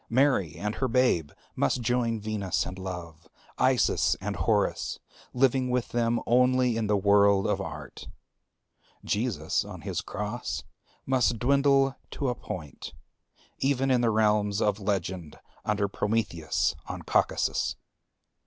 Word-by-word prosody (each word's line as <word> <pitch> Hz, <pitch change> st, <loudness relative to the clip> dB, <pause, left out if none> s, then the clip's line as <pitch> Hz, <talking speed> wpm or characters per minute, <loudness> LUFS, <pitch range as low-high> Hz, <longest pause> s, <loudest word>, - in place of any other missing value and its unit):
Mary 125 Hz, -, +2 dB
and 105 Hz, +1 st, -3 dB
her 130 Hz, -, 0 dB
babe 120 Hz, -, +2 dB, 0.3 s
must 120 Hz, -, 0 dB
join 115 Hz, -1 st, +1 dB
Venus 105 Hz, -4 st, -1 dB
and 90 Hz, +1 st, -7 dB
Love, 85 Hz, -4 st, -7 dB, 0.3 s
Isis -, -, +3 dB
and -, -, -3 dB
Horus; -, -, 0 dB, 0.3 s
living 130 Hz, 0 st, +2 dB
with 125 Hz, -1 st, 0 dB
them 120 Hz, 0 st, +1 dB
only 125 Hz, 0 st, +3 dB
in 110 Hz, -2 st, -1 dB
the 105 Hz, 0 st, +2 dB
world 100 Hz, 0 st, +4 dB
of -, -, 0 dB
art. -, -, -8 dB, 1.0 s
Jesus 105 Hz, -8 st, 0 dB
on -, -, -9 dB
his -, -, -3 dB
cross 105 Hz, +4 st, -4 dB, 0.4 s
must 125 Hz, -3 st, +2 dB
dwindle 135 Hz, +2 st, +3 dB
to 140 Hz, -, -2 dB
a -, -, 0 dB
point, 75 Hz, -, -8 dB, 0.7 s
even 135 Hz, -1 st, +1 dB
in 125 Hz, -1 st, +3 dB
the 120 Hz, -, +3 dB
realms 105 Hz, -2 st, +2 dB
of 105 Hz, -1 st, +1 dB
legend 95 Hz, -5 st, -3 dB, 0.3 s
under 105 Hz, -1 st, +1 dB
Prometheus 100 Hz, -6 st, 0 dB
on -, -, -6 dB
Caucasus. -, -, +1 dB
110 Hz, 130 wpm, -27 LUFS, 100-125 Hz, 1.0 s, world